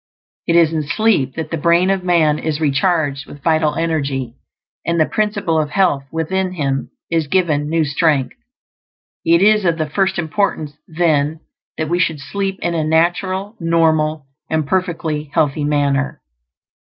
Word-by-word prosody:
It 170 - +2
is 165 -2 +4
in 160 - 0
sleep 145 - +1
that 160 - -5
the 165 - -2
brain 170 +4 +3
of 190 -2 -1
man 160 -4 +2
is 155 -1 -2
recharged 145 -1 0
with 145 -1 -12
vital 155 -2 +2
energy, 140 -7 -2 0.5
and 170 0 0
the 155 - +4
Principle 205 -6 0
of 150 - -3
Health 150 -5 +1
within 185 +3 -1
him 140 -5 -2 0.2
is 165 -3 +1
given 150 -4 +1
new 165 -1 +1
strength. 145 -2 +1 0.9
It 170 +2 +4
is 215 0 +4
of 170 -2 +1
the 155 -1 -1
first 190 +2 +1
importance, 160 -3 -1
then, 155 -2 0 0.4
that 155 - -2
we 175 +3 0
should 160 -3 0
sleep 195 +6 -3
in 170 - 0
a 160 -2 0
natural, 185 +6 0
normal, 160 -3 +1 0.2
and 160 -1 0
perfectly 160 -3 -2
healthy 145 0 +1
manner. 140 -2 0
160 Hz, 155 wpm, -18 LUFS, 150-175 Hz, 0.9 s, is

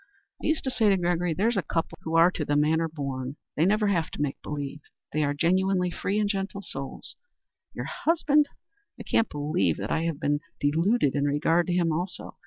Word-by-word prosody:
I - - -2
used 315 +1 +1
to 265 - -1
say 220 -4 +3
to 195 - +4
Gregory, 175 -1 0
'there's 220 +5 +1
a - - +3
couple 165 +1 -3
who 160 0 -3
are 165 +2 +6
to 165 - -3
the 145 0 0
manner 160 +3 +3
born; 140 -4 -4 0.2
they 160 +4 +3
never 210 +2 +3
have 170 -5 +1
to - - -6
make 140 -2 -3
believe. 145 0 -5 0.3
They 155 +1 +1
are 145 0 0
genuinely 180 +3 +2
free 200 +3 -2
and 210 - +2
gentle 195 0 -3
souls.' 135 -6 -5 0.6
Your - - -4
husband? 300 -3 +2 0.5
I - - -6
can't 225 - +2
believe 145 - 0
that 100 +1 -4
I 165 +1 +1
have 165 -4 -2
been 145 0 +1 0.2
deluded 160 - +2
in 145 -1 +1
regard 165 +5 +2
to 180 - 0
him, 175 -2 +2
also. 175 +4 -4
165 Hz, 205 wpm, -27 LUFS, 145-195 Hz, 0.6 s, are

